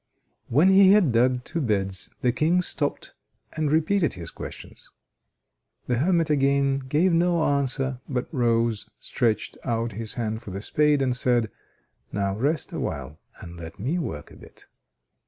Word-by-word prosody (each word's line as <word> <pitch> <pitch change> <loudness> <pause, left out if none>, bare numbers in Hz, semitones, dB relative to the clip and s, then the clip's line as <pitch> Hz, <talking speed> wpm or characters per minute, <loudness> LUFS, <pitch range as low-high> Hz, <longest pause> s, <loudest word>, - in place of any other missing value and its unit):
When 150 +10 +4
he 190 0 +7
had 195 -10 +4
dug 125 +2 +2
two 165 +4 -3
beds, 100 -6 -1
the 125 - +3
King 165 +8 +2
stopped 145 -4 -2 0.4
and 155 -2 -1
repeated 165 +2 +2
his 85 -2 -7
questions. - - -10 1.0
The 125 - 0
hermit 165 0 +2
again 140 -1 +2
gave 150 +7 +1
no 170 0 +2
answer, 135 -2 0
but 125 -2 -2
rose, 115 -4 +1
stretched 115 -4 -1
out 115 -1 -1
his 110 +1 -4
hand 110 -2 -3
for 110 - -10
the 95 +1 -5
spade, 150 +1 +2
and 125 -2 0
said: 120 -4 +1 0.6
"Now 100 -1 -1
rest 145 +8 -1
awhile 70 +2 -4 0.2
and 85 0 -10
let 80 -1 -9
me 140 - -1
work 75 - -5
a - - -14
bit." - - -17
130 Hz, 155 wpm, -25 LUFS, 110-155 Hz, 1.0 s, he